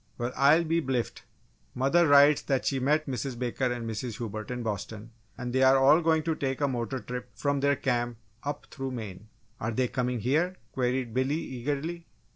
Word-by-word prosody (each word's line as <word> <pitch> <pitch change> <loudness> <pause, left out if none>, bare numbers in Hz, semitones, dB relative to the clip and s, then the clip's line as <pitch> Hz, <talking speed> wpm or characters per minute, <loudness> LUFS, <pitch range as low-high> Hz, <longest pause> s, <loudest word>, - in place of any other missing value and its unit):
"Well! 120 +1 -3
I'll 145 +5 +5
be 165 +1 +1
bliffed! 130 -4 -2 0.5
Mother 150 +7 +3
writes 145 +1 +6
that 135 -2 -1
she 135 - +1
met 150 +4 +2
Mrs. 130 -1 -4
Baker 125 +1 -1
and 120 -2 -4
Mrs. 115 0 -4
Hubert 110 -3 -5
in 125 -1 -4
Boston 110 +1 -5 0.3
and 125 -1 -4
they 130 - +2
are 130 0 +6
all 140 +5 +6
going 160 -1 +2
to 165 +1 0
take 135 -3 -2
a 145 - +2
motor 125 0 -2
trip 125 +2 -6
from 140 +4 0
their 140 +1 +3
camp 120 -3 -1 0.2
up 145 0 -4
through 135 -2 -4
Maine." 105 -3 -7 0.3
"Are 110 - -2
they 125 +2 +1
coming 125 -1 -2
here?" 160 - +1 0.2
queried 125 -2 -1
Billy, 130 +4 +1
eagerly. 150 +5 -4
130 Hz, 190 wpm, -28 LUFS, 120-145 Hz, 0.5 s, writes